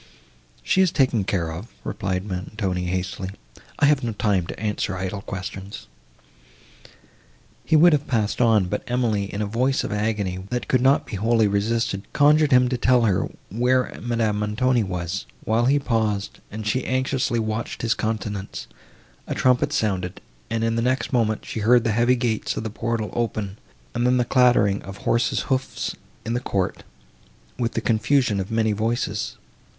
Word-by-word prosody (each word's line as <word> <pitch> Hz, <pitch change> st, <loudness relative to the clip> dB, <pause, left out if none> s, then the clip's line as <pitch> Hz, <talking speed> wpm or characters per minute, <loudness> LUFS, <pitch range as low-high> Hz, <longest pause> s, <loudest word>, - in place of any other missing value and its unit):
"She 190 Hz, -, +3 dB
is 185 Hz, -3 st, +3 dB
taken 125 Hz, -8 st, +2 dB
care 85 Hz, -4 st, -1 dB
of," 85 Hz, +8 st, -7 dB, 0.2 s
replied 95 Hz, 0 st, -2 dB
Montoni 95 Hz, -1 st, -3 dB
hastily, 95 Hz, +1 st, -3 dB, 0.5 s
"I -, -, +4 dB
have 145 Hz, -2 st, +3 dB
no 115 Hz, -2 st, -1 dB
time 100 Hz, -5 st, +1 dB
to -, -, -7 dB
answer 105 Hz, -2 st, -2 dB
idle 95 Hz, +2 st, -3 dB
questions." 95 Hz, +1 st, -7 dB, 1.8 s
He 160 Hz, -, +2 dB
would 165 Hz, +2 st, +7 dB
have 145 Hz, 0 st, 0 dB
passed 110 Hz, -3 st, 0 dB
on, 110 Hz, -5 st, +4 dB
but 105 Hz, +3 st, -2 dB
Emily, 115 Hz, -5 st, 0 dB
in 105 Hz, +1 st, -2 dB
a -, -, -1 dB
voice 125 Hz, +6 st, +1 dB
of -, -, -4 dB
agony, 105 Hz, -3 st, -1 dB
that 125 Hz, 0 st, -3 dB
could 130 Hz, -, +2 dB
not 135 Hz, +2 st, +4 dB
be 100 Hz, -, -5 dB
wholly 110 Hz, +1 st, +3 dB
resisted, 100 Hz, 0 st, -1 dB
conjured 150 Hz, +1 st, +4 dB
him 125 Hz, -1 st, +6 dB
to 125 Hz, -1 st, -2 dB
tell 125 Hz, 0 st, +4 dB
her, 100 Hz, -5 st, +1 dB, 0.2 s
where 125 Hz, +4 st, +1 dB
Madame 115 Hz, -3 st, 0 dB
Montoni 120 Hz, +4 st, +1 dB
was; 90 Hz, -, -3 dB, 0.2 s
while 115 Hz, +2 st, +2 dB
he 140 Hz, +3 st, +4 dB
paused, 110 Hz, -6 st, -1 dB
and 110 Hz, +1 st, -6 dB
she 125 Hz, +5 st, 0 dB
anxiously 130 Hz, -1 st, 0 dB
watched 110 Hz, +1 st, -3 dB
his 115 Hz, 0 st, +3 dB
countenance, 105 Hz, -2 st, -4 dB, 0.6 s
a -, -, -3 dB
trumpet 125 Hz, -1 st, +2 dB
sounded, 95 Hz, -4 st, -1 dB, 0.3 s
and, 115 Hz, 0 st, -1 dB
in 115 Hz, 0 st, +1 dB
the 115 Hz, -, +1 dB
next 130 Hz, +3 st, 0 dB
moment, 110 Hz, -3 st, +1 dB
she -, -, -4 dB
heard 120 Hz, +2 st, +4 dB
the 115 Hz, -, +1 dB
heavy 120 Hz, +3 st, +3 dB
gates 120 Hz, -3 st, -1 dB
of -, -, -2 dB
the 110 Hz, -, -4 dB
portal 115 Hz, -1 st, -2 dB
open, 110 Hz, -4 st, -2 dB, 0.3 s
and 120 Hz, +1 st, +1 dB
then 125 Hz, 0 st, +3 dB
the 125 Hz, -, +2 dB
clattering 120 Hz, -7 st, +3 dB
of 95 Hz, 0 st, -9 dB
horses' 115 Hz, +4 st, +1 dB
hoofs 130 Hz, -1 st, -2 dB, 0.3 s
in 115 Hz, -, -2 dB
the 120 Hz, -, +1 dB
court, 100 Hz, -6 st, -2 dB, 0.8 s
with 120 Hz, -1 st, -1 dB
the -, -, -1 dB
confusion 115 Hz, -1 st, +2 dB
of 95 Hz, -, -3 dB
many 110 Hz, -1 st, +1 dB
voices. 110 Hz, 0 st, -2 dB
110 Hz, 170 wpm, -23 LUFS, 100-125 Hz, 1.8 s, would